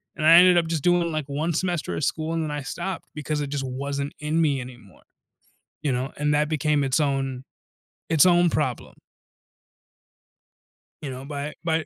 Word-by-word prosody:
and 155 - -2
I 165 - +8
ended 180 0 +7
up 170 -1 +2
just 160 -3 -2
doing, 175 -1 +2
like, 155 -3 -3
1 155 +4 -1
semester 175 0 -2
of - - -3
school 160 +2 -2
and 165 - -1
then 155 - -3
I 150 -1 -3
stopped 175 +7 -5
because 150 0 -2
it 145 - -2
just 140 -1 -3
wasn't 140 +2 -4
in 155 +2 0
me 140 -5 +1
anymore, 120 - -13 0.8
you 145 - 0
know, 130 +3 -2
and 150 0 +1
that 150 +1 +1
became 150 -2 +1
its 135 +3 +1
own 135 -3 -1 0.7
its 160 -1 +5
own 175 -1 +5
problem. 145 -6 -2 2.1
You 145 - -4
know, 130 +1 -8
by 145 +1 -5
by 160 -1 0
150 Hz, 180 wpm, -24 LUFS, 140-165 Hz, 2.1 s, I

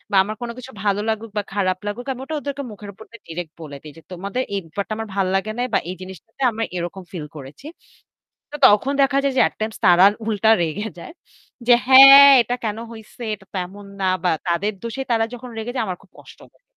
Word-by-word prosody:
বা - - +2
আমার 215 +2 -6
কোন 240 - -3
কিছু 255 +1 -10
ভালো 205 0 +1
লাগুক 220 0 -4
বা 205 - 0
খারাপ 185 -2 0
লাগুক 225 +5 -5
আমি 255 - -9
ওটা 315 - -6
ওদের 285 -1 -5 0.2
মুখের 205 0 -10
উপর 220 - -13
দিয়ে 230 -2 -14
direct 165 -1 -6
বলে 145 -3 -8
দেই 150 -1 -11
যে, - - -15
"তোমাদের 200 +8 -3
এই 200 - -1
ব্যাপারটা 200 +6 -5
আমার 225 0 -5
ভাল 195 -2 0
লাগে 195 +3 -2
না - - 0
বা - - +5
এই 185 - -6
জিনিসটাতে 190 - -11
আমরা 225 0 -3
এরকম 175 +2 -5
ফিল 165 -5 -6
করেছি।" 145 - -11 0.9
তো - - -7
তখন 210 +7 +3
দেখা 275 0 +2
যায় 275 -1 0
যে - - +5
at - - -11
times 220 0 -4
তারা 180 0 +7 0.2
উল্টা 220 0 +2
রেগে 175 +6 -2
যায়। 170 - -10 0.5
যে, 245 - +7
"হ্যাঁ 275 +1 +10
এটা 240 +1 -2
কেন 215 0 -2
হইছে 225 +1 -11
এটা 195 -2 -10
তো - - -3
এমন 200 +2 -13 0.2
না" - - 0 0.2
বা 180 - +2 0.2
তাদের 175 +5 0
দোষে 235 +3 -5
তারা 225 -1 +2
যখন 245 +1 -9
রেগে 225 +2 -4
যায় 250 - 0
আমার 180 -1 -4
খুব 185 - -25
কষ্ট - - -16
হয়। - - -34
210 Hz, 230 wpm, -21 LUFS, 185-240 Hz, 0.9 s, হ্যাঁ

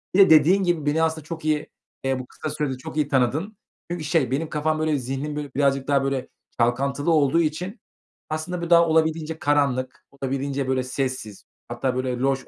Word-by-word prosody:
Bir - - +4
de 195 - +8
dediğin 160 +5 +6
gibi 175 -4 0
beni 155 +2 +2
aslında 160 -1 -1
çok 160 -1 -7
iyi, 155 -1 0 0.4
eee, 135 -1 0
bu 130 - -6
kısa 155 - -6
sürede 135 -4 -2
çok 130 - -8
iyi 150 -2 +2
tanıdın. 145 - 0 0.3
Çünkü 175 -2 -3
şey 150 -5 +1
benim 155 +4 -1
kafam, 155 +1 0
böyle, 155 -1 +1
zihnim, 135 +3 -4
böyle, 145 -2 -5
birazcık 135 -1 +1
daha, 140 -1 +3
böyle, 135 -1 -1 0.3
çalkantılı 135 +6 +1
olduğu 155 +1 +4
için 175 +8 -3 0.5
aslında 160 +3 -3
bir 170 - -4
daha 170 -1 +6
olabildiğince 160 0 +1
karanlık, 140 -3 0
olabildiğince, 135 0 -3
böyle, 130 -1 +1
sessiz, 130 -5 -4 0.3
hatta, 130 -1 -1
böyle, 130 0 -1
loş. 135 0 0
145 Hz, 190 wpm, -24 LUFS, 135-160 Hz, 0.5 s, de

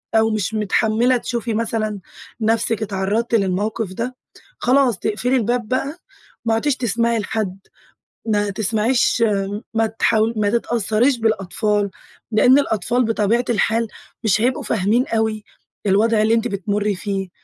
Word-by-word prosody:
أو 220 0 +4
مش 215 0 -1
متحملة 220 +4 +2
تشوفي 235 -1 -3
مثلًا 215 -2 -2 0.4
نفسك 225 0 +1
اتعرَّضتِ 205 +4 -1
للموقف 200 +1 -1
ده، 240 +5 -4 0.4
خلاص 250 -4 +3
تقفلي 245 +5 0
الباب 240 -1 0
بقى. 275 +6 -2 0.5
ما 225 - +2
عدتيش 270 +5 +1
تسمعي 235 -1 0
لحد، 200 -2 -3 0.7
ما 205 -2 +1
تسمعيش 220 +4 +1 0.5
ما 225 0 +2
تحاول 225 0 +1
ما 205 -1 +2
تتأثريش 235 +2 +1
بالأطفال، 210 -1 0 0.4
لإن 250 +5 +5
الأطفال 240 0 0
بطبيعة 225 +2 +1
الحال 225 +1 +1 0.4
مش 215 0 +2
هيبقوا 250 +2 +1
فاهمين 220 +5 +1
أوي 220 -1 -1 0.4
الوضع 215 +3 +3
اللي 220 +1 +3
أنتِ 230 +1 +1
بتمُرّي 205 0 -1
فيه. 195 0 -3
220 Hz, 125 wpm, -20 LUFS, 210-235 Hz, 0.7 s, لإن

